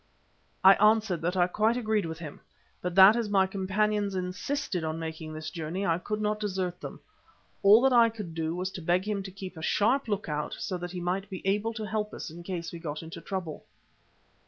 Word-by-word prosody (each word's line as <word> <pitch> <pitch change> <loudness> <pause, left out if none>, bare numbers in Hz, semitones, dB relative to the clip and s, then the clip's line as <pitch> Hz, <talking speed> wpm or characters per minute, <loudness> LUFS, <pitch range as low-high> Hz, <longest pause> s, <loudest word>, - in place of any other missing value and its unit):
I 190 +1 +10
answered 215 -5 +3
that 175 +3 -1
I 175 - +5
quite 215 +6 +1
agreed 215 -6 0
with 160 0 -5
him, 155 -4 -9 0.4
but 180 -1 -3
that 195 +3 +9
as 235 -3 -1
my 195 -2 +4
companions 200 +1 0
insisted 185 - -3
upon 160 0 -2
making 160 -1 -6
this 155 0 -6
journey, 170 +4 -3
I 165 -1 +1
could 210 +3 -3
not 210 0 -1
desert 185 -4 -3
them. - - -8 0.6
All 205 +4 +7
that 265 -1 +4
I 235 -1 +6
could 210 -7 -7
do 160 0 -2
was 185 +1 -3
to 185 - -7
beg 175 +4 +1
him 205 -2 -1
to 190 - -7
keep 190 -1 -8
a - - -7
sharp 235 - +2
look 205 -1 -2
out 150 -1 -3
so 185 - -3
that 175 0 -5
he 180 0 -6
might 185 +3 -2
be 190 -2 -7
able 210 +4 0
to 220 -2 -4
help 210 +1 -3
us - - -6
in 170 +2 -10
case 170 -1 -5
we 170 - -8
got 155 -1 -5
into 165 +1 -9
trouble. 185 -5 -5
190 Hz, 220 wpm, -28 LUFS, 170-210 Hz, 0.6 s, I